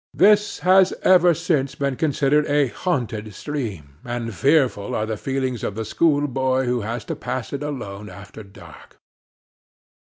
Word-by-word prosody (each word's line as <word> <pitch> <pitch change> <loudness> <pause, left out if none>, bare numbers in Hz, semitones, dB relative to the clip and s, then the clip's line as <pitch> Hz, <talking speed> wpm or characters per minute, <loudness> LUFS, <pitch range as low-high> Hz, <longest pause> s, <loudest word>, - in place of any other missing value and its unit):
This 210 +1 +4
has 190 0 +5
ever 180 -2 +5
since 150 -5 -1
been 140 -2 -1
considered 150 0 +1
a 145 -2 +2
haunted 115 - -3
stream, 100 - -6
and 120 -2 -4
fearful 135 -5 +1
are 110 - -1
the 110 0 -3
feelings 130 0 -3
of 100 - -3
the 110 0 -4
schoolboy 135 -3 +1
who 125 -1 0
has 110 +1 -5
to - - -4
pass 130 0 -5
it 140 - -3
alone 105 -9 -6
after 100 +4 -11
dark. 100 -2 -15
130 Hz, 150 wpm, -22 LUFS, 110-150 Hz, -, has